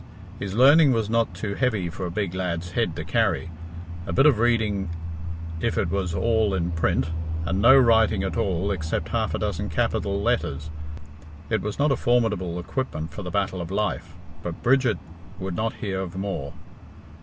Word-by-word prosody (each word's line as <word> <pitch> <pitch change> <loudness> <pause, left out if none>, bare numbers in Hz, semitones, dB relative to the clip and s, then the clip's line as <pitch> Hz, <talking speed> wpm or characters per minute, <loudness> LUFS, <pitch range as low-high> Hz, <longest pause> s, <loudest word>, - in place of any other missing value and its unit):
His 100 -1 -4
learning 140 +3 +7
was 110 -2 0
not 115 -5 +1
too 100 +2 -3
heavy 110 -7 0
for 90 +2 -4
a - - -4
big 95 0 -2
lad's 90 -2 -3
head 85 -2 0
to 80 - -4
carry 85 - 0 0.6
a - - -2
bit 95 +12 +4
of 145 -8 +5
reading 110 -5 +1 0.7
if - - -1
it - - 0
was 90 -4 -1
all 110 +1 +2
in 85 -1 -1
print, 80 -2 0 0.3
and 90 +4 0
no 130 +5 +8
writing 110 -5 +4
at 95 - -2
all 95 +1 0
except 80 -5 -2
half - - 0
a - - 0
dozen - - -2
capital 100 0 0
letters. 80 - -1 0.8
It 110 - +2
was 105 -1 -4
not 145 +1 +3
a - - +3
formidable 105 -9 +1
equipment 85 - -4
for - - -6
the 90 - -5
battle 95 -2 -1
of 85 - -6
life, 95 -4 -2 0.3
but 85 -1 -6
Bridget 125 -5 +3 0.4
would 95 -2 -4
not 110 +3 -1
hear 95 -2 -3
of 90 -2 -5
more. 95 -8 -3
100 Hz, 180 wpm, -25 LUFS, 90-115 Hz, 0.8 s, no